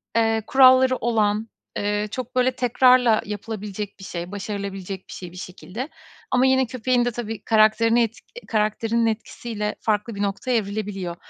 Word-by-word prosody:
eee, 225 Hz, -1 st, +2 dB
kuralları 260 Hz, -1 st, +6 dB
olan, 220 Hz, -1 st, 0 dB, 0.3 s
eee, 205 Hz, +1 st, -1 dB
çok, 255 Hz, +1 st, -6 dB
böyle, 255 Hz, 0 st, +3 dB
tekrarla 250 Hz, -2 st, +4 dB
yapılabilecek 210 Hz, -1 st, -6 dB
bir -, -, -11 dB
şey, 175 Hz, -1 st, -6 dB
başarılabilecek 195 Hz, -2 st, -5 dB
bir -, -, -8 dB
şey, 180 Hz, -2 st, -8 dB
bir 180 Hz, -, -13 dB
şekilde. 185 Hz, -, -7 dB, 0.4 s
Ama 255 Hz, +1 st, +4 dB
yine 265 Hz, 0 st, +4 dB
köpeğin 250 Hz, 0 st, 0 dB
de 245 Hz, -, 0 dB
tabii 225 Hz, -1 st, -6 dB
karakterini 225 Hz, +2 st, +4 dB
et 225 Hz, 0 st, -3 dB, 0.3 s
karakterinin 225 Hz, +1 st, 0 dB
etkisiyle 220 Hz, -1 st, -3 dB
farklı 215 Hz, +1 st, -1 dB
bir 200 Hz, -, -4 dB
noktaya 205 Hz, +6 st, -1 dB
evrilebiliyor. 200 Hz, -4 st, -4 dB
220 Hz, 150 wpm, -23 LUFS, 205-240 Hz, 0.4 s, kuralları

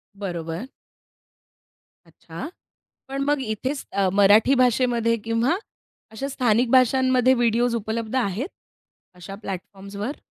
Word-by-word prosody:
बरोबर. 175 Hz, +1 st, -5 dB, 1.4 s
अच्छा. 310 Hz, -, -9 dB, 0.6 s
पण 275 Hz, +1 st, -4 dB
मग 290 Hz, -1 st, +1 dB
इथेच 255 Hz, +4 st, -3 dB
अ, 195 Hz, -1 st, +2 dB
मराठी 205 Hz, +6 st, +5 dB
भाषेमध्ये 245 Hz, -2 st, +2 dB
किंवा 235 Hz, +9 st, +1 dB, 0.5 s
अशा 270 Hz, +5 st, -4 dB
स्थानिक 245 Hz, -2 st, +1 dB
भाषांमध्ये 255 Hz, 0 st, +4 dB
व्हिडिओज 235 Hz, 0 st, +1 dB
उपलब्ध 220 Hz, +1 st, -3 dB
आहेत 240 Hz, -, -1 dB, 0.7 s
अशा 180 Hz, +2 st, -9 dB
प्लॅटफॉर्म्सवर? 200 Hz, -, -6 dB
230 Hz, 100 wpm, -23 LUFS, 200-255 Hz, 1.4 s, मराठी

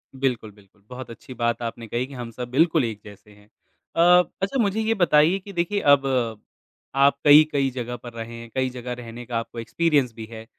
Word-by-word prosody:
बिल्कुल, 125 Hz, -5 st, -2 dB
बिल्कुल। 100 Hz, 0 st, -24 dB
बहुत 125 Hz, 0 st, -8 dB
अच्छी 115 Hz, +2 st, -11 dB
बात 120 Hz, -1 st, -1 dB
आपने 115 Hz, 0 st, -5 dB
कही 120 Hz, +3 st, -2 dB
कि 140 Hz, -, -13 dB
हम 120 Hz, -3 st, -7 dB
सब 120 Hz, +1 st, -7 dB
बिल्कुल 160 Hz, +2 st, +3 dB
एक 110 Hz, -2 st, -5 dB
जैसे 105 Hz, 0 st, -14 dB
हैं। 105 Hz, 0 st, -20 dB, 0.5 s
अ, 180 Hz, +1 st, +6 dB, 0.2 s
अच्छा 200 Hz, +8 st, -1 dB
मुझे 205 Hz, +1 st, 0 dB
ये 220 Hz, +1 st, +1 dB
बताइए 175 Hz, -2 st, +3 dB
कि 200 Hz, +1 st, -12 dB
देखिए 180 Hz, +4 st, -1 dB, 0.2 s
अब 135 Hz, -1 st, -8 dB, 0.9 s
आप 140 Hz, +1 st, +4 dB
कई-कई 145 Hz, -2 st, +5 dB
जगह 125 Hz, -1 st, -5 dB
पर 120 Hz, -1 st, -11 dB
रहे 115 Hz, 0 st, -7 dB
हैं, 115 Hz, 0 st, -10 dB
कई 130 Hz, -1 st, +1 dB
जगह 125 Hz, 0 st, -6 dB
रहने 120 Hz, 0 st, -9 dB
का 115 Hz, -1 st, -3 dB
आपको 115 Hz, +1 st, -8 dB
एक्सपीरियंस 140 Hz, 0 st, +1 dB
भी 110 Hz, 0 st, -8 dB
है। 110 Hz, -1 st, -9 dB
125 Hz, 205 wpm, -23 LUFS, 115-155 Hz, 0.9 s, अ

